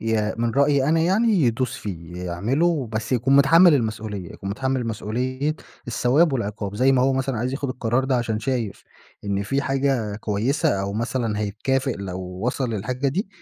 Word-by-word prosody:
يا 110 -1 0
من 115 0 +1
رأيي 140 +2 +3
أنا 160 +1 +3
يعني 190 +8 +2
يدوس 125 +1 0
فيه 85 -4 -7
يعمله، 130 - 0
بس 110 +3 -2
يكون 130 +3 +3
متحمل 165 +5 +7
المسؤوليّة؛ 110 -5 -5
يكون 95 - -6
متحمل 130 +2 -1
مسؤوليّة 125 +7 -2 0.3
الثواب 130 +7 +2
والعقاب، 105 -4 -3
زي 130 +5 +3
ما 130 -1 +3
هو 135 +1 +3
مثلًا 130 -2 -1
عايز 125 +3 -2
ياخد 140 0 -3
القرار 125 0 0
ده 135 -1 +1
عشان 115 -3 -1
شايف 115 -4 -3 0.4
إن 100 0 -1
في 135 +7 -1
حاجة 135 -6 0
كويّسة 105 0 0
أو 100 0 -3
مثلًا 115 0 -2
هيتكافئ 130 +6 -1
لو 95 -2 -5
وصل 105 +8 -3
للحاجة 125 +6 -1
دي، 190 +9 -2
125 Hz, 170 wpm, -23 LUFS, 105-135 Hz, 0.4 s, متحمل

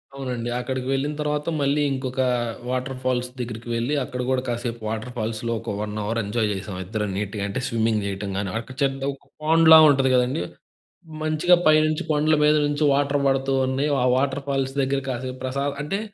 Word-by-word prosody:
అవునండి. 125 -3 -4
అక్కడికి 130 +1 -3
వెళ్ళిన 135 +2 0
తర్వాత 150 0 -2
మళ్ళీ 140 +1 +2
ఇంకొక 130 -1 -2 0.5
వాటర్ 130 +1 -2
ఫాల్స్ 125 -1 0
దగ్గరికి 120 -1 -5
వెళ్లి 120 +5 -1
అక్కడ 125 0 -5
గూడా 130 -1 +1
కాసేపు 120 -1 -3
వాటర్ 110 +3 -4
ఫాల్స్‌లో 115 +1 -2
ఒక - - -4
1 105 0 -4
అవర్ 115 +3 -1
ఎంజాయ్ 110 +2 0
చేసాం 95 -1 -6
ఇద్దరం 105 +1 -3
నీట్‌గా. 100 0 -3
అంటే 100 +5 -3
స్విమ్మింగ్ 110 -2 +1
చేయటం 100 0 -4
గాని 100 -2 -2
అక్కడ 130 +3 -10
చెడ్డ్ 135 0 0
ఒక 135 - -14
పాండ్‌లా 160 +1 +7
ఉంటది 135 -2 +3
కదండీ, 125 -4 +1 0.8
మంచిగా 155 +3 +4
పైనుంచి 155 0 +3
కొండల 155 +1 +3
మీద 150 0 +5
నుంచి 145 +1 -1
వాటర్ 140 0 +1
పడుతూ 135 0 +1
ఉన్నాయి. 135 +3 0
ఆ - - +2
వాటర్ 135 +1 0
ఫాల్స్ 135 -1 -1
దగ్గర 135 +1 0
కాసేపు 130 0 -4
ప్రసా 135 +2 -2 0.2
అంటే 195 +7 -2
130 Hz, 175 wpm, -23 LUFS, 115-140 Hz, 0.8 s, పాండ్‌లా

